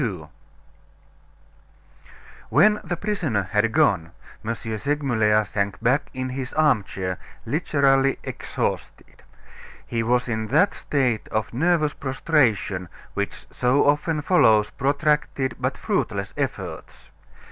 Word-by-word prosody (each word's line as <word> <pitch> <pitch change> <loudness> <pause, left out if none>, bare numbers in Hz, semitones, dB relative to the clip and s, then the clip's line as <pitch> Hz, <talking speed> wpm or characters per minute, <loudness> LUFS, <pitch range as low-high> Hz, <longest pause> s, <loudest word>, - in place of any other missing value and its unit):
XIII 95 - -2 2.3
When 210 0 +5
the 175 0 -3
prisoner 170 - -1
had 105 +4 +1
gone, 85 -6 +2 0.3
M. 115 +2 -2
Segmuller 110 -2 +1
sank 100 -1 -2
back 125 +5 +1
in 130 0 -4
his 130 0 -5
armchair, 100 -11 +1 0.3
literally 135 -3 +2
exhausted. - - -4 0.6
He 115 - -2
was 125 +2 +1
in 110 -2 -2
that 155 - +3
state 125 -7 -1
of 110 +1 -2
nervous 155 +2 +2
prostration 125 - 0 0.2
which - - -4
so 125 +3 +2
often 150 +1 +1
follows 110 - +4
protracted 140 -2 0
but - - -1
fruitless - - -2
efforts. - - -5
130 Hz, 105 wpm, -23 LUFS, 110-150 Hz, 2.3 s, When